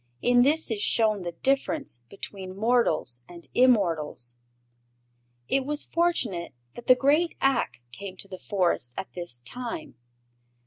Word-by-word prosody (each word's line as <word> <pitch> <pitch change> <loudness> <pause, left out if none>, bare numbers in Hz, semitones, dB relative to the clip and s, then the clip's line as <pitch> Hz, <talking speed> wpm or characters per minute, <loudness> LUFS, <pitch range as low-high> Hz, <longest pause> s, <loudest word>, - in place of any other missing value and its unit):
In 245 0 +5
this 295 +1 +3
is 210 -2 -1
shown 215 -2 +2
the 175 -1 -4
difference 275 - -1
between 190 -1 -7
mortals 200 - +2
and 170 -1 -10
immortals. 165 - +2 1.1
It 270 - +2
was 295 +2 +1
fortunate 250 - 0 0.2
that 240 - -11
the 255 - +8
great 295 +6 +2
Ak 270 - +1
came 190 +6 -8
to 195 - -8
the 185 -2 -8
Forest 175 - 0
at - - -6
this 175 -9 -3
time. 255 - -6
215 Hz, 135 wpm, -27 LUFS, 175-270 Hz, 1.1 s, the